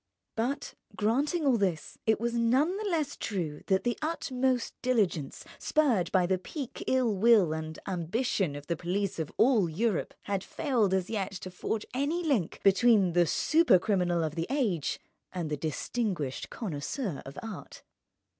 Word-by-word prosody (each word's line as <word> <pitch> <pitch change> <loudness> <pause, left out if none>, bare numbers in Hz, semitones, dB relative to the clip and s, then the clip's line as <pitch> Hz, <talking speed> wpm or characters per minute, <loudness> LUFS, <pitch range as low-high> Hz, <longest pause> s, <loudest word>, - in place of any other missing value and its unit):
But—granting 265 +4 -1
all 260 -4 +4
this—it 195 +3 -1
was 235 +1 -1
none 255 +9 +2
the 420 -1 -2
less 310 -5 -1
true 165 -8 -3
that 190 0 +2
the 240 - -1
utmost 265 -5 -1
diligence, 200 - 0
spurred 255 - +2
by 185 -2 +3
the 185 +1 +1
pique, 270 - -6
ill 250 -5 +2
will, 200 -5 +5
and 160 0 -5
ambition 185 - -1
of 145 0 -8
the 170 - -1
police 185 +3 -2
of 160 - -3
all 225 -8 +4
Europe, 205 +4 -1
had 200 -2 -2
failed 240 - 0
as 190 +2 -1
yet 200 -3 -2
to 185 -1 -7
forge 210 +4 -3
any 290 +7 0
link 260 - 0
between 200 -2 +5
the 175 -1 +4
supercriminal 185 - +3
of 155 - -3
the 165 +1 -3
age 220 - 0 0.3
and 170 -4 -3
the - - +1
distinguished 160 - -2
connoisseur 190 - -4
of 135 - -10
art. 225 -2 -8
205 Hz, 150 wpm, -29 LUFS, 175-255 Hz, 0.3 s, will